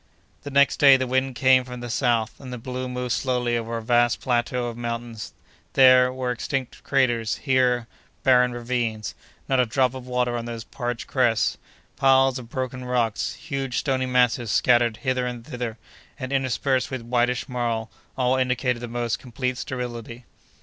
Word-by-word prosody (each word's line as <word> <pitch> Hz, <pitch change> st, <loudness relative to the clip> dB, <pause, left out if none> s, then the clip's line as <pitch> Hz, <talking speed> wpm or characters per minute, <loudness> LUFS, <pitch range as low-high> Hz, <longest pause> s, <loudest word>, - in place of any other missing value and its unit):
The 145 Hz, -, -7 dB
next 140 Hz, 0 st, +3 dB
day 140 Hz, -2 st, +7 dB
the 130 Hz, -, -1 dB
wind 130 Hz, +1 st, 0 dB
came 130 Hz, 0 st, +4 dB
from 125 Hz, -1 st, -8 dB
the 120 Hz, -, -5 dB
south, 115 Hz, -1 st, 0 dB
and 130 Hz, -2 st, -9 dB
the 125 Hz, -, -5 dB
balloon 125 Hz, +1 st, -5 dB
moved 125 Hz, -1 st, -3 dB
slowly 125 Hz, -2 st, 0 dB
over 115 Hz, 0 st, -3 dB
a 115 Hz, -, -6 dB
vast 120 Hz, 0 st, +3 dB
plateau 125 Hz, 0 st, 0 dB
of 120 Hz, -1 st, -4 dB
mountains: 115 Hz, -2 st, -5 dB, 0.4 s
there, 130 Hz, -1 st, +6 dB
were 130 Hz, -1 st, -2 dB
extinct 130 Hz, +1 st, -4 dB
craters; 125 Hz, -5 st, +1 dB
here, 125 Hz, -3 st, +1 dB, 0.4 s
barren 125 Hz, -2 st, +5 dB
ravines; 120 Hz, -3 st, -2 dB, 0.3 s
not 130 Hz, -1 st, +2 dB
a 125 Hz, -, +4 dB
drop 130 Hz, +2 st, +1 dB
of 130 Hz, -1 st, -8 dB
water 125 Hz, -1 st, 0 dB
on 115 Hz, -1 st, -3 dB
those 115 Hz, -1 st, -6 dB
parched 120 Hz, +1 st, -4 dB
crests; 120 Hz, -4 st, +1 dB, 0.4 s
piles 135 Hz, -1 st, +4 dB
of 120 Hz, -2 st, -11 dB
broken 130 Hz, 0 st, -4 dB
rocks; 120 Hz, -3 st, -1 dB
huge 135 Hz, -5 st, -4 dB
stony 130 Hz, -2 st, 0 dB
masses 125 Hz, -2 st, +2 dB
scattered 120 Hz, +1 st, +3 dB
hither 130 Hz, -1 st, +1 dB
and 120 Hz, -2 st, -6 dB
thither, 120 Hz, -5 st, -5 dB, 0.4 s
and, 130 Hz, 0 st, -5 dB
interspersed 130 Hz, 0 st, 0 dB
with 130 Hz, -3 st, -5 dB
whitish 120 Hz, +1 st, 0 dB
marl, 120 Hz, -3 st, -2 dB, 0.3 s
all 130 Hz, 0 st, +2 dB
indicated 125 Hz, -1 st, 0 dB
the 120 Hz, -, -6 dB
most 120 Hz, -1 st, -2 dB
complete 125 Hz, +1 st, -3 dB
sterility. 120 Hz, -2 st, -6 dB
125 Hz, 170 wpm, -24 LUFS, 120-130 Hz, 0.4 s, day